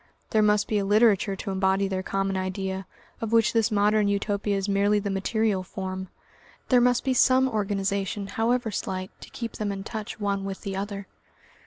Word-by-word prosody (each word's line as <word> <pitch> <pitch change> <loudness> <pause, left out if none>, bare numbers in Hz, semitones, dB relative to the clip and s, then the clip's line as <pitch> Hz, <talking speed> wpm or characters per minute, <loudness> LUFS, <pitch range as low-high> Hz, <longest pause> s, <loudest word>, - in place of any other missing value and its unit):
There 215 - +4
must 210 0 +3
be 210 - +1
a - - 0
literature 205 -1 +3
to 195 +1 -5
embody 190 +1 +1
their 190 -1 -2
common 195 0 -1
idea, 190 0 -3 0.3
of 225 -1 -3
which 230 -1 +4
this 225 -1 +3
Modern 210 0 +3
Utopia 200 0 0
is 195 +1 -2
merely 200 +1 +3
the 200 -1 -2
material 200 +1 0
form; 190 0 -5 0.6
there 250 -2 +5
must 245 0 +3
be 265 - +1
some 260 +1 +4
organisation, 200 -2 -1
however 225 +3 0
slight, 185 -1 -4
to - - -10
keep 230 -2 -6
them 210 -2 -2
in 195 -1 -5
touch 215 0 -6
one 200 -1 -1
with 195 -1 -5
the 195 -1 -4
other. 200 0 -4
200 Hz, 185 wpm, -26 LUFS, 195-215 Hz, 0.6 s, there